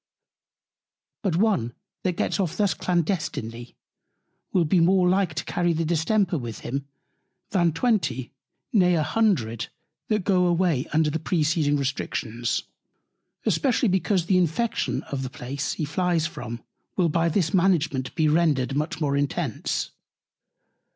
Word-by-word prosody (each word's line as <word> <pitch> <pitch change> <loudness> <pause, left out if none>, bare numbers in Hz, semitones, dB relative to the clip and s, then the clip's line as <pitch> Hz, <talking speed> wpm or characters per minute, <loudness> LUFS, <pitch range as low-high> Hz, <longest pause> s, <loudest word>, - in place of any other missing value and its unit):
But 195 -7 0
one 175 - +1 0.3
that 185 - 0
gets - - 0
off 175 -5 -1
thus 205 -5 +2
clandestinely, 155 - -2 0.8
will 180 -3 +3
be 175 +4 +3
more 180 +2 +4
like 185 -3 +2
to - - -3
carry 175 -1 +1
the 165 +1 -1
Distemper 175 +2 +1
with 115 -3 -6
him, 135 +3 -4 0.6
than 175 -4 +3
twenty, 160 - 0 0.4
nay 180 -5 +4
a 155 - +2
hundred, 145 - +1 0.4
that 215 -3 0
go 180 -2 +3
away 170 -5 +1
under 155 -1 +2
the 160 - -1
preceding 155 -2 +1
Restrictions: 120 -4 -2 0.8
Especially 250 -4 +2
because 185 -1 +1
the 185 0 +3
Infection 180 +7 0
of 140 -1 -4
the 130 - -4
Place, 140 +1 -4
he 155 - -2
flies 170 +1 0
from, 120 -7 -6 0.3
will 180 -3 +3
by 165 +2 +2
this 165 -1 0
Management 165 -8 +1
be 155 -2 +2
rendered 150 -4 +2
much 150 +1 -2
more 145 -3 +1
intense. 140 0 -1
165 Hz, 135 wpm, -25 LUFS, 140-185 Hz, 0.8 s, more